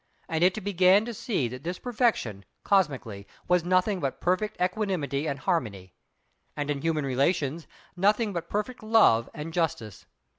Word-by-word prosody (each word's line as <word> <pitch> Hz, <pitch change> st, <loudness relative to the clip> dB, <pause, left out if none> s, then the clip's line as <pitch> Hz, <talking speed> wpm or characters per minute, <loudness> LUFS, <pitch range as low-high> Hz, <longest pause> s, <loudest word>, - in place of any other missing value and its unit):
And 160 Hz, +1 st, 0 dB
it 185 Hz, +3 st, +2 dB
began 190 Hz, +1 st, +4 dB
to 240 Hz, -, -5 dB
see 195 Hz, -, -1 dB
that 125 Hz, +2 st, -8 dB
this 175 Hz, +2 st, -3 dB
Perfection, 220 Hz, -, -1 dB, 0.2 s
cosmically, 135 Hz, -, 0 dB, 0.2 s
was 180 Hz, -1 st, +3 dB
nothing 185 Hz, +2 st, +1 dB
but 135 Hz, -4 st, -3 dB
perfect 185 Hz, +4 st, -1 dB
Equanimity 180 Hz, -7 st, -1 dB
and 140 Hz, -2 st, -2 dB
Harmony; 110 Hz, -, -2 dB, 0.6 s
and 145 Hz, 0 st, -1 dB
in 140 Hz, -1 st, -3 dB
human 155 Hz, -2 st, 0 dB
relations, 140 Hz, +3 st, 0 dB, 0.3 s
nothing 205 Hz, +3 st, +2 dB
but 170 Hz, -1 st, -5 dB
perfect 210 Hz, +5 st, -3 dB
Love 215 Hz, -, +4 dB
and 155 Hz, +2 st, -6 dB
Justice. 145 Hz, -, -3 dB
170 Hz, 150 wpm, -27 LUFS, 140-200 Hz, 0.6 s, began